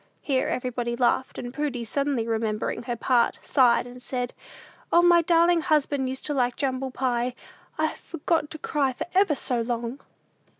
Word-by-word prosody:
Here 265 -3 +1
everybody 245 -1 -2
laughed, 250 +1 +1
and 245 0 -6
Prudy, 280 -5 -2
suddenly 270 0 -1
remembering 220 -1 -1
her 240 0 -3
part, 240 0 +2
sighed, 245 -3 +4
and 250 0 -11
said, 250 -1 -3 0.6
"O, 345 - +5
my 345 -1 +6
darlin' 340 0 +4
husband 285 -4 +1
used 260 0 -5
to 295 - -2
like 245 -3 +1
jumble 265 -1 -2
pie! 250 -1 -1 0.4
I've 315 0 0
forgot 325 -1 -1
to 315 - -7
cry 285 -3 0
for - - -4
ever 375 -5 +4
so 245 -3 0
long!" 235 +2 -3
260 Hz, 165 wpm, -26 LUFS, 245-295 Hz, 0.6 s, my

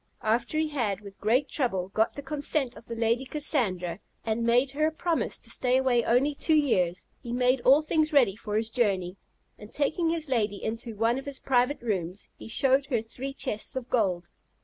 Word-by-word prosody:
After 235 +6 0
he 315 0 +1
had, 220 -9 -1
with 200 -1 -13
great 245 +7 +2
trouble, 195 - -2
got 220 +2 +1
the 285 - -7
consent 285 -2 -1
of - - -13
the 230 - -6
Lady 230 +2 +1
Cassandra, 210 - 0 0.3
and 225 +1 -1
made 245 +3 +3
her 305 +2 +1
a - - -1
promise 330 +1 -1
to - - -8
stay 255 0 +2
away 255 -3 +2
only 255 +6 +2
two 315 +3 +1
years, 185 - +1 0.2
he 235 - -7
made 250 +1 +2
all 275 +5 +5
things 310 0 +1
ready 255 -10 +4
for 210 -1 -3
his 225 +1 -1
journey; 195 -7 0 0.4
and 210 - -12
taking 310 +3 0
his 325 -2 -2
lady 220 -6 0
into 230 +1 -4
one 230 +4 +1
of 270 - -10
his 280 -1 -5
private 250 +1 +1
rooms, 190 -4 -3
he - - -11
showed 265 +4 +2
her 235 -6 0
three 255 +4 -6
chests 215 -5 -3
of 255 -1 -5
gold. 185 -8 0
245 Hz, 200 wpm, -27 LUFS, 215-280 Hz, 0.4 s, all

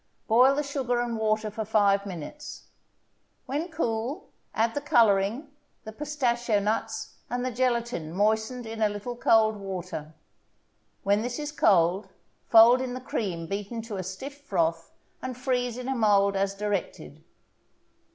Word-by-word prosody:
Boil 250 +4 +5
the 295 - 0
sugar 265 -4 -1
and 240 -1 -1
water 215 -1 0
for 220 +2 -4
five 200 -2 +2
minutes; 190 - -8 0.8
when 300 +6 -3
cool, 270 - -3 0.3
add 225 +1 +1
the 290 - -2
coloring, 230 +1 +2 0.3
the 220 - -7
pistachio 240 -5 0
nuts, 220 +2 -3
and 245 +1 -2
the 255 - -1
gelatin 235 -9 -1
moistened 220 +6 0
in 225 0 -6
a 215 - +4
little 205 +4 -5
cold 220 -2 +3
water. 180 -5 -6 0.9
When 200 +1 +2
this 245 +1 -3
is 295 0 -4
cold, 190 - +3 0.4
fold 235 +3 +7
in 255 -1 -3
the - - -4
cream 190 -9 -3
beaten 205 +5 -4
to 220 -3 -6
a - - -2
stiff 265 +11 -7
froth, 165 - -1 0.3
and 255 -1 -5
freeze 250 -2 -1
in 250 0 -6
a 270 - 0
mold 200 -4 +3
as 195 0 0
directed. 200 - -4
225 Hz, 150 wpm, -27 LUFS, 200-250 Hz, 0.9 s, fold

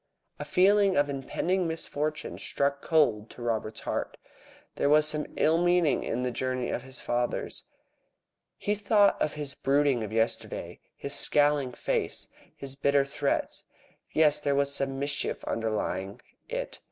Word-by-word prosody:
A - - -4
feeling 195 0 +4
of 145 0 +3
impending 170 +7 -1
misfortune 155 -2 -2
struck 140 0 -1
cold 120 -10 +2
to 120 - -10
Robert's 110 -2 -2
heart. - - -3 0.6
There 140 - +1
was 150 +1 +5
some 150 -1 -1
ill 160 +2 +3
meaning 175 -3 +3
in 125 +2 -2
this 125 -1 -1
journey 130 0 -2
of - - -2
his 130 0 -9
father's. 120 0 -2 0.9
He 205 - 0
thought 205 0 +3
of 150 - +1
his 145 -2 -5
brooding 140 -3 +2
of 105 - -5
yesterday, 115 +1 -2 0.2
his 140 - -5
scowling 145 -4 +2
face, - - -2 0.3
his 135 -1 -4
bitter 140 0 +2
threats. 140 - -2 0.5
Yes, 150 -2 +4
there 140 -1 0
was 140 0 +1
some 135 -1 0
mischief 140 +1 -1
underlying 100 -3 -2 0.3
it. - - -4
140 Hz, 145 wpm, -28 LUFS, 125-155 Hz, 0.9 s, was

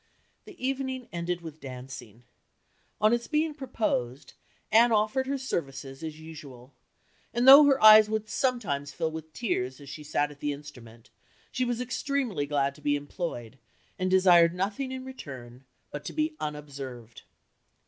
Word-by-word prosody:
"The 400 - -13
evening 260 -2 -3
ended 175 0 -3
with 160 -2 -10
dancing. 125 -4 -10 0.8
On 215 +2 +4
its 235 -1 -1
being 310 0 0
proposed, 215 - -3 0.4
Anne 230 +2 +6
offered 220 +5 +1
her 275 +1 -1
services, 135 - -5
as 155 -1 -6
usual; 145 -5 -12 0.6
and 240 +2 +2
though 280 +2 +11
her 275 -1 +4
eyes 215 0 +9
would 215 0 -2
sometimes 215 - -1
fill 160 -1 -2
with 160 0 -8
tears 130 - -2
as 140 -1 -12
she 150 - -8
sat 145 0 -1
at 145 - -15
the 145 0 -1
instrument, 125 -6 -13 0.4
she 255 - -1
was 240 -1 -2
extremely 250 - -2
glad 140 -1 0
to 150 - -18
be 145 0 +1
employed, 145 - -6 0.4
and 185 0 0
desired 180 -2 +5
nothing 205 +8 -2
in 260 0 -6
return 130 - -10 0.3
but 145 - -6
to - - -5
be 310 0 -1
unobserved." 140 -6 -7
165 Hz, 155 wpm, -28 LUFS, -, 0.8 s, though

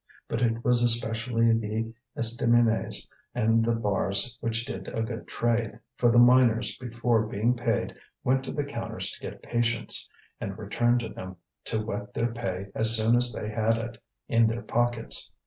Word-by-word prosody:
But 115 - -3
it 115 -1 0
was 125 -1 +4
especially 115 0 +1
the 115 0 -2 0.2
estaminets 115 0 +2 0.3
and 115 -1 +2
the 115 0 +1
bars 105 +1 +2
which 115 0 0
did 135 - -7
a 115 - -3
good 115 +1 -6
trade, 115 -2 -1 0.2
for 120 - +2
the 120 - +3
miners 120 -2 +4
before 115 -2 0
being 110 +4 0
paid 115 -3 -1 0.3
went 130 +1 +1
to - - -5
the 145 +1 -2
counters 140 0 -4
to - - -9
get - - -9
patience, 120 -1 0 0.3
and 95 0 -5
returned 120 +3 0
to 110 - -5
them 95 -2 -9 0.3
to 110 -1 -1
wet 105 -1 -6
their 115 0 -1
pay 95 -4 -5
as 110 +1 +7
soon 110 +2 +3
as 120 0 +3
they 105 -1 -5
had 110 +1 0
it 115 0 -7 0.3
in 115 -1 +3
their 115 +2 -3
pockets. 120 +1 0
115 Hz, 170 wpm, -27 LUFS, 110-120 Hz, 0.3 s, as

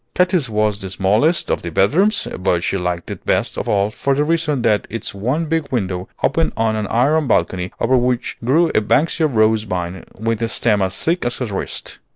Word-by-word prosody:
Katy's 180 - +2
was 105 -1 0
the 95 - -6
smallest 105 - +1
of - - 0
the 85 - -5
bedrooms, 170 - +2
but 90 -2 +1
she 90 - -1
liked 90 -2 -3
it - - -7
best - - 0
of - - -4
all 100 +1 +1
for 140 +5 0
the 145 - +2
reason 155 -4 0
that 105 -2 +2
its 115 -2 -4
one 125 +12 -1
big 160 -1 -1
window 95 -6 -2
opened 165 - +1
on 110 -1 +1
an 105 -1 -2
iron 145 +7 +2
balcony 90 -5 0
over 130 +3 +2
which 125 -1 0
grew 160 +8 +3
a - - +3
Banksia 155 +8 +2
rose 110 -4 +2
vine 90 -3 -4
with 115 +1 -2
a 115 - +1
stem 110 -2 +1
as 95 0 -1
thick 170 +2 0
as 120 0 -2
her 125 - -2
wrist. 100 -4 -5
115 Hz, 205 wpm, -19 LUFS, 100-150 Hz, -, grew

